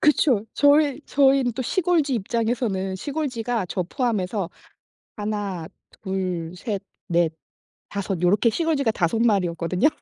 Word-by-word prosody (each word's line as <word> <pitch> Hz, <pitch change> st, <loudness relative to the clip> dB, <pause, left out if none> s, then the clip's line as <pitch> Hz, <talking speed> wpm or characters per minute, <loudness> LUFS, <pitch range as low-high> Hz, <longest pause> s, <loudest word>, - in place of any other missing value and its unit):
그쵸. 275 Hz, -7 st, +3 dB
저희 285 Hz, -1 st, +4 dB
저희는 270 Hz, -3 st, +3 dB
또 260 Hz, +3 st, -3 dB
시골쥐 325 Hz, -, +1 dB
입장에서는 220 Hz, -3 st, -1 dB
시골쥐가 245 Hz, -6 st, -2 dB
저 185 Hz, -, -2 dB
포함해서 200 Hz, -, -1 dB, 0.7 s
1, 205 Hz, -5 st, -3 dB, 0.4 s
2, 180 Hz, -3 st, -2 dB
3, 200 Hz, +1 st, -3 dB, 0.3 s
4, 170 Hz, -3 st, +2 dB, 0.6 s
5 195 Hz, -3 st, -3 dB
요렇게 200 Hz, +6 st, +4 dB
시골쥐가 295 Hz, -5 st, +1 dB
5 195 Hz, +2 st, 0 dB
마리였거든요. 180 Hz, -, +2 dB
215 Hz, 230 characters per minute, -24 LUFS, 185-265 Hz, 0.7 s, 저희